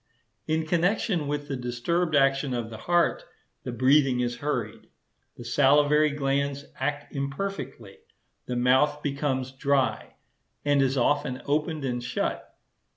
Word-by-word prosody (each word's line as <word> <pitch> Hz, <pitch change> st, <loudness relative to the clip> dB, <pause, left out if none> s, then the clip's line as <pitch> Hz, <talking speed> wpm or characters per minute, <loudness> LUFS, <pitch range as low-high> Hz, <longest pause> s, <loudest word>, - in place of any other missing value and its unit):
In 160 Hz, 0 st, 0 dB
connection 175 Hz, 0 st, +1 dB
with 145 Hz, 0 st, -3 dB
the 140 Hz, -, -3 dB
disturbed 130 Hz, +7 st, -1 dB
action 135 Hz, -1 st, +2 dB
of 115 Hz, -1 st, -4 dB
the 110 Hz, -, -7 dB
heart, 175 Hz, -1 st, +2 dB, 0.4 s
the -, -, -5 dB
breathing 130 Hz, +1 st, +3 dB
is 120 Hz, -1 st, -1 dB
hurried. 120 Hz, -6 st, -3 dB, 0.5 s
The 120 Hz, -, -9 dB
salivary 145 Hz, +4 st, +4 dB
glands 140 Hz, 0 st, -1 dB
act 145 Hz, +2 st, -3 dB
imperfectly; 195 Hz, -, -5 dB, 0.5 s
the 125 Hz, -, -2 dB
mouth 130 Hz, +4 st, +2 dB
becomes 135 Hz, -2 st, -1 dB
dry, 135 Hz, 0 st, 0 dB, 0.5 s
and 145 Hz, -1 st, +3 dB
is 135 Hz, 0 st, +1 dB
often 140 Hz, 0 st, 0 dB
opened 150 Hz, 0 st, -1 dB
and 125 Hz, -2 st, -2 dB
shut. -, -, -3 dB
140 Hz, 130 wpm, -26 LUFS, 130-150 Hz, 0.5 s, salivary